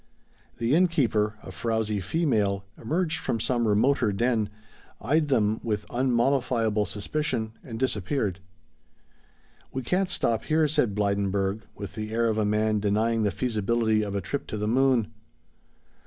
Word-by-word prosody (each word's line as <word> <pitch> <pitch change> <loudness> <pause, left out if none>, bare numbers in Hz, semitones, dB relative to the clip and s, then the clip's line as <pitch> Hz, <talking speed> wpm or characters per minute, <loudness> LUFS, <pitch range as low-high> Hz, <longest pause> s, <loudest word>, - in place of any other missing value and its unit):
The 115 +2 0
inn 180 +4 +5
keeper, 110 - +1
a - - -8
frowsy 110 +2 -1
female, 100 - 0
emerged 160 +6 -1
from 115 - -2
some 120 0 +1
remoter 110 +2 +3
den, 110 0 +1 0.5
eyed 150 +6 +1
them 110 -6 +2
with 105 -3 -2
unmollifiable 120 -4 +1
suspicion 110 0 -2
and 115 -4 -7
disappeared. 105 -5 -1 1.3
"We 130 - -4
can't 185 +8 0
stop 115 - 0
here," 155 0 +3
said 120 -8 +1
Blydenburg 100 0 0
with 100 -2 -7
the 110 0 -5
air 115 0 +2
of 110 0 0
a 105 - +2
man 105 +1 +1
denying 110 +3 +1
the 105 - +2
feasibility 110 -1 +1
of 100 -1 -3
a 100 - 0
trip 140 - -4
to 110 - -4
the 105 0 -2
moon. 125 -2 +2
110 Hz, 145 wpm, -26 LUFS, 105-130 Hz, 1.3 s, inn